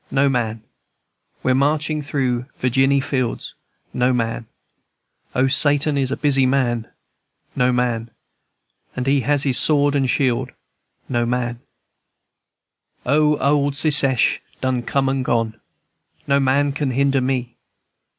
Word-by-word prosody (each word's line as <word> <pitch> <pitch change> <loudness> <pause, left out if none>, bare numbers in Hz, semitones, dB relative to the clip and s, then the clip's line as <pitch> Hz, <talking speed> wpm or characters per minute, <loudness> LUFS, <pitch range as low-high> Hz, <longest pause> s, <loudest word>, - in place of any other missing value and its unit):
No 140 +1 +2
man, 115 -4 -2
&c. - - -36 0.8
We're 130 - +2
marching 150 +3 0
through 130 -4 -2
Virginny 135 +2 +2
fields. 130 -3 -3 0.4
No 125 +1 +1
man, 115 -1 -2
&c. - - -34 0.8
O, 130 - +3
Satan 145 +2 +2
is 135 -2 0
a 140 - -3
busy 135 -3 +3
man, 120 -4 0 0.7
No 125 0 +2
man, 120 -2 -1
&c. - - -30 0.8
And 125 - -3
he 140 0 +2
has 145 +1 +1
his 130 -4 +2
sword 145 -2 +2
and 135 -2 +1
shield, 125 -2 0 0.5
No 120 -2 -1
man, 120 -1 -2
&c. - - -36 1.4
O, 150 +3 +3
old 145 0 +1
Secesh 140 -4 +2 0.2
done 130 -2 -1
come 135 +3 -1
and 135 0 -1
gone! 115 -2 -1 0.6
No 140 0 +2
man 140 +1 +2
can 140 0 -2
hinder 135 +1 +1
me." 125 -2 -2
135 Hz, 140 wpm, -20 LUFS, 125-140 Hz, 1.4 s, O